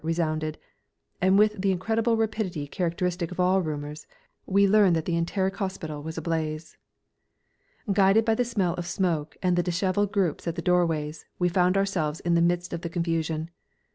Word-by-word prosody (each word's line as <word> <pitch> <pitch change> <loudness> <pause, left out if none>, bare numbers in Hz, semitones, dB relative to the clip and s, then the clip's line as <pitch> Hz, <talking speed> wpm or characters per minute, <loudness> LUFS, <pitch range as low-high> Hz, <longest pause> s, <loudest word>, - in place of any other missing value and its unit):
resounded, 155 -1 -1 0.6
and 190 +1 +4
with 210 -1 +3
the 195 - +2
incredible 225 +5 +1
rapidity 215 -8 -2
characteristic 175 +1 -2
of 180 - -8
all 185 +1 +3
rumours 150 -2 -5 0.4
we 200 +1 +4
learned 200 -3 +5
that 160 -1 -1
the 170 - 0
Enteric 190 +3 -1
Hospital 165 -7 -4
was 160 +2 -7
ablaze. 160 -1 -3 1.2
Guided 195 +3 +4
by 225 - +3
the 245 - +1
smell 200 -8 0
of 175 -1 -5
smoke 170 -5 -1
and 180 -1 +3
the 175 - +3
dishevelled 185 +3 0
groups 180 -6 -1
at 165 - -1
the 170 - -3
doorways, 165 -4 0
we 180 -1 +2
found 180 +2 +2
ourselves 175 -6 0
in 175 - 0
the 170 - +4
midst 175 +1 0
of 170 - -4
the 170 - -4
confusion. 165 -1 -2
175 Hz, 170 wpm, -26 LUFS, 160-195 Hz, 1.2 s, learned